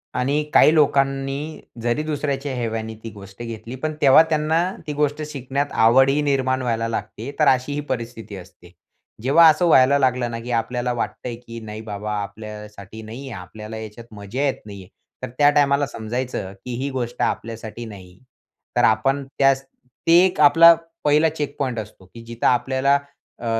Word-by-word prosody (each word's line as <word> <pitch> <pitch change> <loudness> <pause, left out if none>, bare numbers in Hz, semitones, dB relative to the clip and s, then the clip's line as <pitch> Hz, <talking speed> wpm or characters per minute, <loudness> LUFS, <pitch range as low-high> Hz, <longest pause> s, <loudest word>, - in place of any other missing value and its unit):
आणि 140 +4 0
काही 155 - +6
लोकांनी 140 0 0 0.2
जरी 120 +6 0
दुसऱ्याच्या 145 -2 -3
हेव्याने 110 -2 -3
ती 115 - -6
गोष्ट 100 +1 -13
घेतली 115 +1 -7
पण 155 0 -1
तेव्हा 140 +2 +7
त्यांना 155 +1 +1 0.3
ती 150 - -3
गोष्ट 150 +1 -1
शिकण्यात 140 +1 -3
आवडही 135 +5 +5
निर्माण 130 -2 0
व्हायला 115 -2 -1
लागते. 110 +3 -5
तर 150 - +4
अशीही 140 +3 +1
परिस्थिती 115 -4 -5
असते. 90 -1 -15 0.5
जेव्हा 160 +5 +6
असं 155 +3 +2
व्हायला 140 -2 +5
लागलं 125 -2 +1
ना 115 - -4
की 120 +2 -6
आपल्याला 120 +1 -1
वाटतंय, 120 0 -4
की 115 -1 -10
नाही 110 0 -8
बाबा 105 -1 -5
आपल्यासाठी 105 0 -10
नाहीये, 125 +5 -8
आपल्याला 105 +4 -9
ह्याच्यात 110 +2 -9
मजा 105 +5 -5
येत 135 - -1
नाहीये, 100 -3 -10 0.4
तर - - -3
त्या 145 0 +6
टाईमाला 145 -1 +3
समजायचं 115 -4 -4
की 125 - -5
ही 140 - -2
गोष्ट 120 -2 -4
आपल्यासाठी 115 0 -4
नाही. 95 -4 -12 0.6
तर - - +3
आपण 135 +6 +2 0.2
त्यास 135 0 +3 0.4
ते 165 - +7
एक 185 - -1
आपला 165 +3 +8 0.3
पहिला 150 +2 +4
चेकपॉइंट 145 -5 -3
असतो, 105 -3 -10
की 115 0 -11
जिथं 115 0 -5
आपल्याला 130 +2 +2 0.4
अ, 120 - -8
125 Hz, 160 wpm, -22 LUFS, 110-140 Hz, 0.6 s, आपला